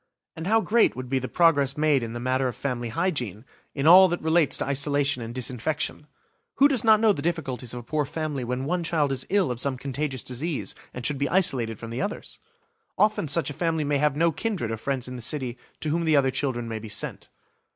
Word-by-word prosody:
And 160 Hz, +2 st, -5 dB
how 225 Hz, +2 st, +4 dB
great 225 Hz, +2 st, +3 dB
would 130 Hz, -1 st, -6 dB
be 135 Hz, 0 st, +1 dB
the 130 Hz, -, -4 dB
progress 145 Hz, -5 st, +3 dB
made 150 Hz, -3 st, +3 dB
in 115 Hz, -1 st, -5 dB
the 120 Hz, -, -5 dB
matter 130 Hz, +2 st, 0 dB
of 125 Hz, -, -4 dB
family 120 Hz, -4 st, -3 dB
hygiene, 120 Hz, -, -2 dB, 0.3 s
in 140 Hz, 0 st, -2 dB
all 185 Hz, +4 st, +9 dB
that 175 Hz, 0 st, -2 dB
relates 160 Hz, -1 st, +2 dB
to -, -, -2 dB
isolation 140 Hz, -1 st, 0 dB
and 115 Hz, 0 st, -6 dB
disinfection! 130 Hz, +5 st, -3 dB, 0.5 s
Who 280 Hz, -, +6 dB
does 265 Hz, -4 st, +1 dB
not 220 Hz, -2 st, +6 dB
know 220 Hz, -1 st, +4 dB
the 145 Hz, -, -5 dB
difficulties 140 Hz, -7 st, -2 dB
of 120 Hz, -, -5 dB
a -, -, -16 dB
poor 150 Hz, +4 st, -1 dB
family 150 Hz, -2 st, -4 dB
when 125 Hz, +2 st, -3 dB
one 175 Hz, +3 st, -1 dB
child 155 Hz, -4 st, 0 dB
is 135 Hz, -, -2 dB
ill 190 Hz, -8 st, +2 dB
of 120 Hz, -, -4 dB
some 130 Hz, 0 st, 0 dB
contagious 135 Hz, 0 st, -3 dB
disease, 145 Hz, +5 st, -3 dB, 0.2 s
and 125 Hz, -, -7 dB
should 145 Hz, -2 st, 0 dB
be 140 Hz, -, 0 dB
isolated 130 Hz, -, +2 dB
from 115 Hz, +1 st, -8 dB
the 120 Hz, +3 st, -3 dB
others? 210 Hz, -, -5 dB, 0.6 s
Often 210 Hz, -4 st, +2 dB
such 150 Hz, +2 st, +1 dB
a -, -, -6 dB
family 165 Hz, 0 st, -1 dB
may 145 Hz, -1 st, 0 dB
have 150 Hz, -1 st, +2 dB
no 165 Hz, +2 st, +3 dB
kindred 185 Hz, -, -3 dB
or 115 Hz, -, -3 dB
friends 130 Hz, +2 st, -3 dB
in 125 Hz, 0 st, -6 dB
the -, -, -8 dB
city 125 Hz, 0 st, 0 dB, 0.3 s
to 155 Hz, -, -1 dB
whom 165 Hz, +2 st, 0 dB
the 160 Hz, -1 st, +3 dB
other 135 Hz, -2 st, +3 dB
children 130 Hz, -3 st, -2 dB
may 110 Hz, -1 st, -4 dB
be 110 Hz, 0 st, -9 dB
sent. -, -, -4 dB
140 Hz, 235 wpm, -25 LUFS, 125-165 Hz, 0.6 s, all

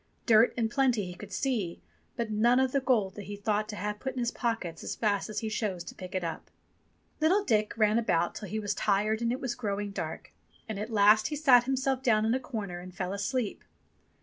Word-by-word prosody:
Dirt 225 Hz, 0 st, +6 dB
in 230 Hz, -2 st, +2 dB
plenty 245 Hz, -4 st, +1 dB
he 180 Hz, -, -6 dB
could 200 Hz, +3 st, -11 dB
see, 210 Hz, -7 st, -1 dB, 0.4 s
but 230 Hz, -2 st, -2 dB
none 235 Hz, +4 st, +4 dB
of 260 Hz, -1 st, +2 dB
the 275 Hz, -, +2 dB
gold 225 Hz, -8 st, +1 dB
that 205 Hz, -1 st, -8 dB
he 205 Hz, +2 st, -6 dB
thought 210 Hz, +1 st, -1 dB
to 210 Hz, -, -5 dB
have 210 Hz, +1 st, -3 dB
put 265 Hz, +3 st, -4 dB
in 255 Hz, -, -4 dB
his 240 Hz, -1 st, 0 dB
pockets 225 Hz, -9 st, -3 dB
as -, -, -4 dB
fast 205 Hz, -2 st, 0 dB
as 210 Hz, -1 st, -3 dB
he 220 Hz, -, -2 dB
chose 195 Hz, -6 st, -2 dB
to -, -, -9 dB
pick 185 Hz, +1 st, -9 dB
it 185 Hz, -, -1 dB
up. 165 Hz, -1 st, -5 dB, 0.7 s
Little 360 Hz, +7 st, +3 dB
Dick 215 Hz, -, +1 dB
ran 215 Hz, 0 st, +4 dB
about 170 Hz, -7 st, +1 dB
till 210 Hz, -, -7 dB
he 215 Hz, -, -3 dB
was 205 Hz, -1 st, -1 dB
tired 210 Hz, +2 st, +1 dB
and 235 Hz, 0 st, +1 dB
it 255 Hz, -, -2 dB
was 255 Hz, -3 st, -2 dB
growing 205 Hz, -3 st, -3 dB
dark. -, -, -6 dB, 0.3 s
And 215 Hz, -3 st, -4 dB
at 215 Hz, +2 st, -4 dB
last 215 Hz, 0 st, +5 dB
he 300 Hz, -, -3 dB
sat 260 Hz, -5 st, +5 dB
himself 265 Hz, 0 st, 0 dB
down 220 Hz, -4 st, +3 dB
in 225 Hz, -, +2 dB
a 260 Hz, -, +1 dB
corner 210 Hz, -9 st, -5 dB
and 180 Hz, 0 st, -10 dB
fell 185 Hz, +1 st, -3 dB
asleep. 210 Hz, +3 st, -2 dB
215 Hz, 230 wpm, -29 LUFS, 200-245 Hz, 0.7 s, Dirt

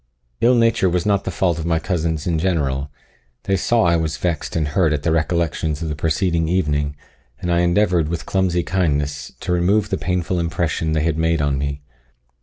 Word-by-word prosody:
Ill 125 Hz, +2 st, +4 dB
nature 115 Hz, -5 st, +3 dB
was 90 Hz, 0 st, 0 dB
not 100 Hz, -1 st, +1 dB
the -, -, -1 dB
fault 85 Hz, -2 st, 0 dB
of 80 Hz, -, -4 dB
my 80 Hz, -1 st, +2 dB
cousins 80 Hz, -3 st, -2 dB
in 85 Hz, -3 st, 0 dB
general; 75 Hz, -6 st, 0 dB, 0.5 s
they 95 Hz, -, +1 dB
saw 115 Hz, +5 st, +2 dB
I 85 Hz, -1 st, +3 dB
was 80 Hz, -1 st, -2 dB
vexed 85 Hz, -3 st, -2 dB
and 80 Hz, -3 st, 0 dB
hurt 80 Hz, 0 st, +2 dB
at 75 Hz, -1 st, -2 dB
the 85 Hz, -, +1 dB
recollections 80 Hz, -1 st, 0 dB
of 80 Hz, -, -3 dB
the 75 Hz, -, -3 dB
preceding 80 Hz, +2 st, 0 dB
evening, 75 Hz, -5 st, 0 dB, 0.4 s
and 90 Hz, -, -2 dB
endeavoured, 85 Hz, -1 st, +2 dB
with 85 Hz, -1 st, -4 dB
clumsy 90 Hz, -2 st, +1 dB
kindness, 75 Hz, -6 st, -1 dB
to -, -, -3 dB
remove 95 Hz, +4 st, +2 dB
the -, -, 0 dB
painful 90 Hz, 0 st, -1 dB
impression 80 Hz, -1 st, -1 dB
they 80 Hz, -1 st, +1 dB
had 80 Hz, -1 st, 0 dB
made 80 Hz, 0 st, +2 dB
on 70 Hz, -2 st, 0 dB
me. 70 Hz, 0 st, -3 dB
85 Hz, 195 wpm, -20 LUFS, 75-90 Hz, 0.5 s, Ill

